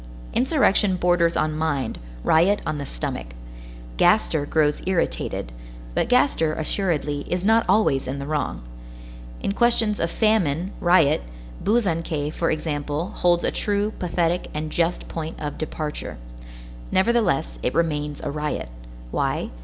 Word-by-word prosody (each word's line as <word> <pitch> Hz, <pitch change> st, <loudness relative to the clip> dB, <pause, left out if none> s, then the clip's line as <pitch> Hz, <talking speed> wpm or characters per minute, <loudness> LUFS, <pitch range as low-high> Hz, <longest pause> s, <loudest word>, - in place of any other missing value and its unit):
Insurrection 235 Hz, -, +3 dB
borders 175 Hz, -1 st, +2 dB
on 155 Hz, 0 st, 0 dB
mind, 145 Hz, -6 st, -1 dB, 0.2 s
riot 180 Hz, +6 st, +4 dB
on 150 Hz, -, -2 dB
the 140 Hz, -, -5 dB
stomach; -, -, -5 dB, 0.6 s
Gaster 145 Hz, -, +3 dB
grows 150 Hz, -1 st, +2 dB
irritated; 175 Hz, -, -1 dB, 0.4 s
but -, -, 0 dB
Gaster, 205 Hz, -, +3 dB
assuredly, 155 Hz, -4 st, -1 dB
is 180 Hz, +1 st, -1 dB
not 225 Hz, +2 st, +4 dB
always 135 Hz, -12 st, +3 dB
in 135 Hz, +2 st, -3 dB
the 140 Hz, -, -5 dB
wrong. 145 Hz, -, -2 dB, 0.8 s
In -, -, 0 dB
questions 225 Hz, -2 st, +2 dB
of 165 Hz, -, 0 dB
famine, 190 Hz, -5 st, +1 dB
riot, 165 Hz, -4 st, +4 dB, 0.4 s
Buzançais, 165 Hz, -9 st, 0 dB
for 165 Hz, -, 0 dB
example, 150 Hz, +1 st, -2 dB
holds 175 Hz, -1 st, +2 dB
a -, -, +1 dB
true, 205 Hz, +1 st, 0 dB
pathetic, 175 Hz, 0 st, 0 dB
and 155 Hz, 0 st, -3 dB
just 170 Hz, +2 st, 0 dB
point 160 Hz, -1 st, -5 dB
of 145 Hz, -1 st, -5 dB
departure. 155 Hz, -, -4 dB, 0.7 s
Nevertheless, 190 Hz, -, +1 dB
it -, -, -1 dB
remains 150 Hz, -3 st, -1 dB
a -, -, -3 dB
riot. 150 Hz, -, -3 dB, 0.4 s
Why? -, -, -1 dB
165 Hz, 130 wpm, -23 LUFS, 150-190 Hz, 0.8 s, riot